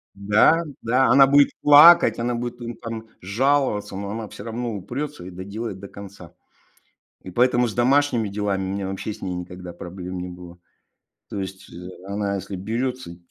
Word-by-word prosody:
Да, 105 Hz, +11 st, +4 dB, 0.2 s
да. 125 Hz, +3 st, +2 dB
Она 135 Hz, +1 st, +7 dB
будет 140 Hz, +1 st, +5 dB
плакать, 150 Hz, +4 st, +8 dB
она 120 Hz, +1 st, -1 dB
будет, 120 Hz, 0 st, -4 dB, 0.2 s
там, 115 Hz, -1 st, -7 dB
жаловаться, 115 Hz, 0 st, 0 dB
но 100 Hz, 0 st, -5 dB
она 110 Hz, 0 st, -5 dB
всё 100 Hz, -, -10 dB
равно 115 Hz, 0 st, -4 dB
упрётся 135 Hz, +7 st, -6 dB
и 90 Hz, -, -8 dB
доделает 100 Hz, +3 st, -6 dB
до 100 Hz, -, -9 dB
конца. 100 Hz, -4 st, -12 dB, 0.9 s
И 95 Hz, -, -10 dB
поэтому 125 Hz, +3 st, +3 dB
с 110 Hz, -, -5 dB
домашними 125 Hz, -3 st, +2 dB
делами 100 Hz, -1 st, -2 dB
у -, -, -3 dB
меня 100 Hz, -1 st, -3 dB
вообще 95 Hz, +2 st, -4 dB
с -, -, -15 dB
ней 95 Hz, -, -3 dB
никогда 90 Hz, 0 st, -8 dB
проблем 90 Hz, +1 st, -7 dB
не 90 Hz, 0 st, -5 dB
было. 90 Hz, -1 st, -11 dB, 0.7 s
То 100 Hz, -, -5 dB
есть 95 Hz, 0 st, -8 dB, 0.4 s
она 100 Hz, 0 st, -2 dB
если 95 Hz, 0 st, -6 dB
берётся, 115 Hz, 0 st, -4 dB
105 Hz, 165 wpm, -23 LUFS, 95-125 Hz, 0.9 s, плакать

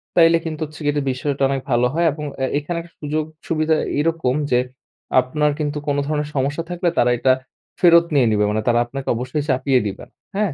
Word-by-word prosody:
তাইলে 165 Hz, -1 st, +6 dB
কিন্তু 160 Hz, -1 st, -5 dB
হচ্ছে 150 Hz, 0 st, -13 dB
এটা 145 Hz, 0 st, -1 dB
বিষয়টা 140 Hz, +2 st, -3 dB
অনেক 135 Hz, -1 st, -1 dB
ভালো 120 Hz, 0 st, +3 dB
হয়। 170 Hz, +1 st, +1 dB
এবং 150 Hz, +1 st, -6 dB, 0.2 s
এ -, -, +3 dB
এখানে 170 Hz, +4 st, -4 dB
একটা 170 Hz, 0 st, -16 dB
সুযোগ 150 Hz, +1 st, -1 dB, 0.2 s
সুবিধা 160 Hz, 0 st, +1 dB, 0.2 s
এরকম 160 Hz, -4 st, +1 dB, 0.2 s
যে, 125 Hz, -, +4 dB, 0.6 s
আপনার 150 Hz, +4 st, 0 dB
কিন্তু 150 Hz, 0 st, -2 dB
কোনো 145 Hz, 0 st, +1 dB
ধরনের 150 Hz, -1 st, -1 dB
সমস্যা 140 Hz, +4 st, -1 dB
থাকলে 175 Hz, 0 st, 0 dB
তারা 120 Hz, 0 st, +4 dB
এটা 130 Hz, +2 st, +3 dB, 0.5 s
ফেরত 170 Hz, -1 st, +6 dB
নিয়ে 135 Hz, -5 st, +4 dB
নিবে। 105 Hz, 0 st, +2 dB
মানে 110 Hz, +1 st, 0 dB
তারা 120 Hz, -1 st, +4 dB
আপনাকে 135 Hz, +2 st, -7 dB
অবশ্যই 130 Hz, +5 st, -2 dB
চাপিয়ে 130 Hz, 0 st, +2 dB
দিবেন। 100 Hz, -, -7 dB, 0.3 s
হ্যাঁ? 205 Hz, -7 st, 0 dB
145 Hz, 195 wpm, -21 LUFS, 130-160 Hz, 0.6 s, তাইলে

